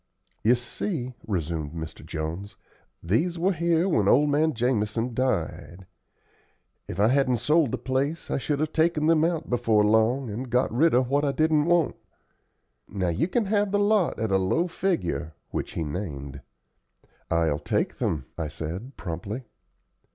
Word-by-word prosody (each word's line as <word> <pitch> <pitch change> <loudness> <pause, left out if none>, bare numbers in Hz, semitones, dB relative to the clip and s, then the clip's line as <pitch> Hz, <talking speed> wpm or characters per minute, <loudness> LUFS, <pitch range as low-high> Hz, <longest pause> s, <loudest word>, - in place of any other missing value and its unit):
"You 115 +4 +5
see," 125 - -4
resumed 80 -6 -2
Mr. 80 -1 -7
Jones, 80 +6 -5 0.5
"these 155 - +1
were 180 +4 +2
here 170 +1 +2
when 110 - +2
old 145 +7 +4
man 155 0 +2
Jamison 115 0 0
died. 90 -7 -2 1.0
If - - -6
I 105 +2 +5
hadn't 130 -2 +3
sold 150 +3 +3
the 130 - -1
place 135 +6 -2
I - - 0
should 145 +1 -1
have 155 0 -1
taken 160 -1 +2
them 160 -1 +4
out 165 -2 0
before 115 -4 +2
long, 110 +5 +3
and 125 +5 -5
got 125 0 +1
rid 155 +4 +4
of 125 0 +3
what 140 +3 +1
I 140 - +2
didn't 155 +1 +2
want. 170 -2 +2 0.9
Now 95 -3 -1
you 85 - 0
can 225 +4 0
have 205 0 +1
the 205 - +2
lot 205 -2 +2
at 110 -2 -1
a 95 - +4
low 95 - +1
figure," 85 - -2 0.2
which - - -4
he 80 - -2
named. 70 -4 -5 0.9
"I'll 80 -3 +1
take - - -1
them," 70 -5 -1
I 80 - -1
said, 85 - -6
promptly. 100 +8 -5
125 Hz, 160 wpm, -26 LUFS, -, 1.0 s, You